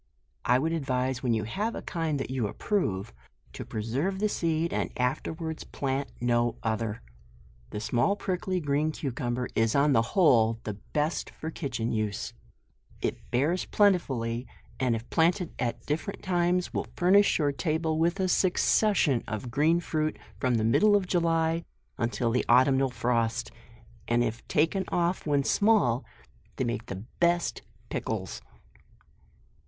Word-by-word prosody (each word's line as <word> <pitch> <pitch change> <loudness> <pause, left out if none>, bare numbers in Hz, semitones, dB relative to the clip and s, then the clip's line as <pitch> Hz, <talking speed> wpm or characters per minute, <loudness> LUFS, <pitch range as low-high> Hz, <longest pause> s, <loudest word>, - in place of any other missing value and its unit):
I 125 - +4
would 160 +5 0
advise, 130 -4 -1
when 120 -3 +1
you 110 - -1
have 205 - -2
a - - -6
kind 160 -4 -2
that 130 - -4
you 125 -5 0
approve, 100 - -1 0.4
to - - -6
preserve 130 - -2
the 210 +2 +1
seed, 165 -2 0
and - - -1
af 125 +1 +1
terwards 160 -1 -5
plant 135 -1 -3
no 120 -1 +1
other. 110 0 -2 0.7
The 105 - -5
small, 120 - +1
prickly 185 -1 -2
green 150 0 0
cucumber, 125 -4 -3
is 115 0 +2
on 140 +1 +4
the 115 - +5 0.2
whole, 115 -10 +5
the 105 - -3
best 150 - -2
for 160 - -7
kitchen 120 -8 -3
use; 110 +1 -2 0.7
it - - -4
bears 150 +9 +1
plentifully, 130 - +1 0.3
and 125 -3 +2
if 115 +1 -6
planted 170 +1 +2
at 120 -2 -2
different 155 +6 -3
times, 180 0 +1
will - - -2
furnish 195 +3 +4
your 145 -3 +2
table 160 +1 -1
with 170 +4 +1
a 190 - +2
succession 180 - +3
of 110 +2 -4
green 155 +6 +3
fruit 155 -2 -1 0.2
from 125 -2 +1
the 110 - +1
middle 205 - +4
of 200 -2 +2
July, 165 -2 +1 0.4
until 115 0 0
the 125 - +1
autumnal 130 +2 +5
frost, 115 -2 -1 0.6
and 120 0 +3
if 115 0 -3
taken 165 +6 +2
off 175 -1 0
when 145 -2 +2
small, 200 - +3 0.5
they - - -1
make 115 -2 -3
the 95 +3 -6
best 170 0 +2
of - - -30
pickles. - - -3
140 Hz, 150 wpm, -28 LUFS, 120-170 Hz, 0.7 s, the